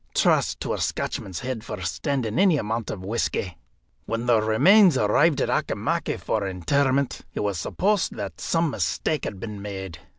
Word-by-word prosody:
Trust - - +2
to - - -2
a - - -3
Scotchman's 95 -3 -3
head 125 -3 -4
for 105 -3 -6
standing 120 - -1
any 190 -5 +5
amount 110 -2 -2
of 95 -2 -6
whisky. 100 -4 -2 0.5
When 115 +1 -2
the 120 -3 +4
remains 160 - +5
arrived 140 +9 +3
at - - 0
Auchimachie - - -1
for 105 -3 -1
interment, 135 - 0
it - - -2
was 100 -4 -1
supposed 200 - 0
that 100 -3 -6
some 165 -2 +1
mistake 155 +2 -1
had 100 - -5
been 105 -2 -6
made. 95 -5 -6
115 Hz, 165 wpm, -24 LUFS, 100-140 Hz, 0.5 s, any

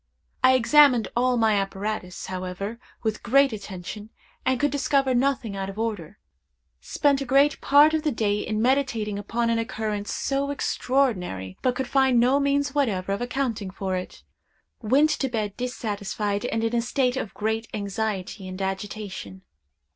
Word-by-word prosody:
I 260 0 +6
examined 255 -1 +5
all 250 +1 +2
my 220 -2 +3
apparatus, 195 -1 -3
however, 185 +4 -5 0.2
with 220 -1 -1
great 275 +2 +4
attention, 205 +1 -7 0.4
and 260 -1 +2
could 290 +1 +2
discover 275 -2 +1
nothing 250 -4 0
out 195 0 -3
of 195 - -9
order. 225 -1 -3 0.6
Spent 280 -2 +1
a - - 0
great 275 +3 +3
part 290 +2 +6
of 315 - +1
the 305 -1 0
day 210 -4 0
in 215 +1 -2
meditating 240 -6 +1
upon 230 +3 -1
an 230 - +1
occurrence 215 -2 -3
so 275 +1 -1
extraordinary, 215 - -1
but 250 -1 +1
could 265 -1 -2
find 265 -2 +3
no 255 +4 +4
means 280 0 +1
whatever 205 -10 0
of 200 - -3
accounting 245 -5 -2
for 190 0 -3
it. 180 0 -6 0.6
Went 275 +7 +3
to 270 - -1
bed 215 -4 -2
dissatisfied, 210 -4 -3
and 225 -2 -1
in 225 +1 0
a 235 - +2
state 250 +1 0
of 230 -6 -4
great 220 +1 -2
anxiety 200 -1 -3
and 185 +1 -7
agitation. 190 - -5
225 Hz, 160 wpm, -25 LUFS, 200-265 Hz, 0.6 s, I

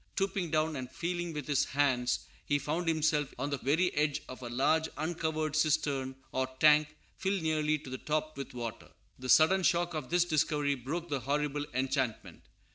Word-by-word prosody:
Stooping 195 -3 -1
down 155 0 +1
and 130 -2 -5
feeling 175 +3 -3
with 150 -3 -5
his 145 -3 +2
hands, 130 -3 +1 0.2
he 145 - +1
found 160 +4 -2
himself 155 -3 +1
on 140 +3 -2
the 140 - -1
very 165 +7 +2
edge 150 0 0
of 130 - -9
a 120 - -5
large 155 +6 +2
uncovered 155 -1 -1
cistern, 145 -4 +1 0.2
or 130 0 0
tank, 150 0 +5 0.2
filled 190 -2 0
nearly 155 -1 +1
to 140 - -11
the 130 - -4
top 155 0 -2
with 135 -2 -7
water. 120 -2 -6 0.3
The 130 0 -6
sudden 160 +9 +6
shock 175 -1 +2
of 150 -5 -4
this 175 0 +3
discovery 150 -3 +1
broke 145 +7 -4
the 140 -2 -1
horrible 145 +3 -1
enchantment. 130 -3 -1
150 Hz, 180 wpm, -31 LUFS, 135-160 Hz, 0.3 s, sudden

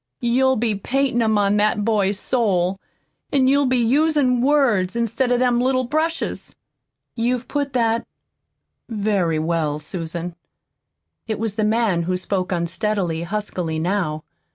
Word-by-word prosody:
You'll 260 +2 +2
be 225 -1 0
paintin' 245 +4 0
'em 220 -2 +2
on 205 0 +2
that 210 0 +1
boy's 205 -3 +1
soul, 195 -6 0 0.5
an' 270 -2 +3
you'll 280 +1 +3
be 255 0 +2
usin' 260 +1 +2
words 245 -10 +2
instead 235 +2 0
of 245 - +3
them 245 -1 +2
little 255 0 +1
brushes." 315 +6 -2 0.6
"You've 245 +1 -1
put 285 0 -2
that 230 -2 +1 0.8
very 200 -7 0
well, 155 -2 -1
Susan." 170 +2 -5 0.9
It 220 -2 -2
was 225 -1 -2
the 215 +1 -1
man 215 -5 +2
who 185 - +1
spoke 185 0 -2
unsteadily, 175 0 -1
huskily, 175 -3 -3
now. 160 -3 -1
215 Hz, 135 wpm, -21 LUFS, 185-250 Hz, 0.9 s, an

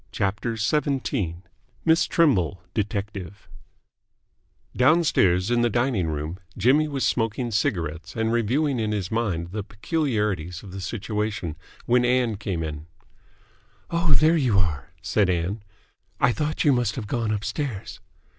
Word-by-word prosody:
CHAPTER 105 +4 -1
XVII 110 - -1 0.4
MISS 165 0 +4
TRIMBLE, 100 - +2
DETECTIVE 100 -3 -4 1.3
Downstairs, 120 - +3
in 120 0 +3
the 120 - +3
dining 120 -6 +1
room, 80 +3 -4 0.2
Jimmy 135 +9 +4
was 140 -3 -1
smoking 115 +1 0
cigarettes 85 -6 -1
and 110 0 0
reviewing 125 +4 +1
in 110 -1 0
his 100 -4 -3
mind 95 -7 -1
the 105 +2 -3
peculiarities 105 - -2
of 100 - -10
the 95 +1 -6
situation, 105 -5 -3 0.3
when 125 +1 +3
Ann 125 -3 +2
came 95 -4 -3
in. 75 0 -6 1.0
"Oh, 170 -2 +2
there 155 +4 +5
you 125 -9 +2
are," 80 -6 0
said 100 -3 +2
Ann. 90 +4 -1 0.6
"I - - +4
thought 150 +4 -1
you 145 - +5
must 120 -3 0
have 115 - -4
gone 115 0 -1
upstairs." 110 +1 -3
110 Hz, 135 wpm, -25 LUFS, 95-125 Hz, 1.3 s, there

